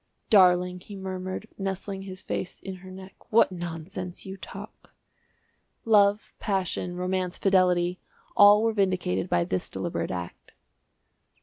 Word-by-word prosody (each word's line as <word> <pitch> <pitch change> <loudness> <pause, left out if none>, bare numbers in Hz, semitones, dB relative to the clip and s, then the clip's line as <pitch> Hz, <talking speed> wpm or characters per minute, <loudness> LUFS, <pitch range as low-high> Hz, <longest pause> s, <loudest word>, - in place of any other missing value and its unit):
"Darling," 180 -2 +5
he 200 +3 -11
murmured, 185 +1 -5
nestling 195 0 -3
his 190 -1 -8
face 180 - -4
in 190 -1 -7
her 185 +1 -12
neck, 190 +1 -10 0.2
"what 225 -3 +5
nonsense 175 +1 -6
you 190 0 -6
talk." 195 - -11 0.9
Love, 205 -1 +4
passion, 185 -3 -1
romance, 180 0 -2
fidelity 180 -2 +2 0.4
all 205 +1 +8
were 225 -1 +2
vindicated 185 - 0
by 85 - +2
this 90 +1 -2
deliberate - - -3
act. 90 -1 -7
185 Hz, 125 wpm, -27 LUFS, 180-195 Hz, 0.9 s, all